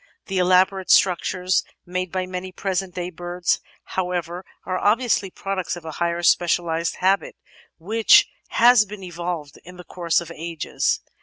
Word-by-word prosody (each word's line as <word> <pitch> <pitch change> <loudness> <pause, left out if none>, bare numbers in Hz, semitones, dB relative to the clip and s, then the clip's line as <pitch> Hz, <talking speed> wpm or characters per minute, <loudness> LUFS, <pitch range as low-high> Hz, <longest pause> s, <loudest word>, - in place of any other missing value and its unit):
The 190 -1 -2
elaborate 185 +1 +3
structures 180 0 +3 0.2
made 185 0 -3
by 185 -1 -2
many 185 0 -6
present 190 0 -3
day 180 0 -4
birds, 175 +1 -1 0.2
how 185 -1 -3
ever, 175 0 -4 0.2
are 185 0 -2
obviously 215 -2 +2
products 190 -1 -4
of 175 -2 -11
a 160 - -5
highly 170 +2 -2
specialised 170 -1 +2
habit 190 +2 +1 0.4
which 220 +7 +5 0.2
has 240 -1 +5
been 205 -1 -9
evolved 170 -4 -5
in 180 +1 -13
the 180 - -10
course 170 -2 0
of 170 -1 -8
ages. 165 -1 -2
180 Hz, 150 wpm, -22 LUFS, 175-190 Hz, 0.4 s, which